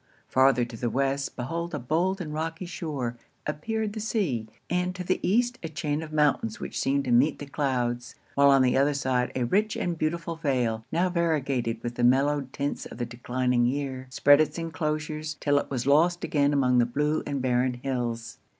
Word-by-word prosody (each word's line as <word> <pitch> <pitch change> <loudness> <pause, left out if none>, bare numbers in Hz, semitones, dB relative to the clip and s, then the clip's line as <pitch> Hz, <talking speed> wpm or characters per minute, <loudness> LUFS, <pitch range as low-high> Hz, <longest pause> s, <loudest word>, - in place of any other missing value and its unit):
Farther 130 -2 +4
to 120 -1 -9
the 120 +1 -2
West, 135 +3 -1
beyond 165 +7 -3
a - - -3
bold 170 +9 0
and 155 -4 -5
rocky 165 +3 -3
shore, 145 -8 -4 0.3
appeared 210 +8 -2
the 220 - -5
sea; 185 - -1 0.2
and 180 +1 -1
to 185 - -4
the 185 +1 0
East, 240 +5 +1
a 165 - -5
chain 155 -1 -2
of 160 -1 -8
mountains 145 -7 +1
which - - -4
seemed 140 +1 +1
to 125 - -1
meet 135 +6 +4
the 145 - -7
clouds; 125 -4 -2 0.2
while 140 0 +5
on 135 -1 +6
the 125 - +3
other 140 +2 +3
side, 130 -2 0
a 130 - 0
rich 210 - +1
and 170 -2 -2
beautiful 165 +2 -1
vale, 125 -7 0
now 175 +3 +2
variegated 140 -10 0
with 120 0 -3
the 120 - -2
mellowed 135 +2 +3
tints 140 +1 -3
of - - -11
the 120 - -2
declining 120 0 0
year, 130 -1 -3
spread 145 +3 +5
its 155 - -1
enclosures, 155 -2 -3
'till 145 -1 +2
it - - -6
was 125 -3 -2
lost 165 +5 +3
again 145 -1 +2
among 130 -3 +3
the 120 - +3
blue 150 +5 0
and 140 -1 -2
barren 125 0 +1
hills. 120 -3 -3
140 Hz, 195 wpm, -27 LUFS, 125-160 Hz, 0.3 s, on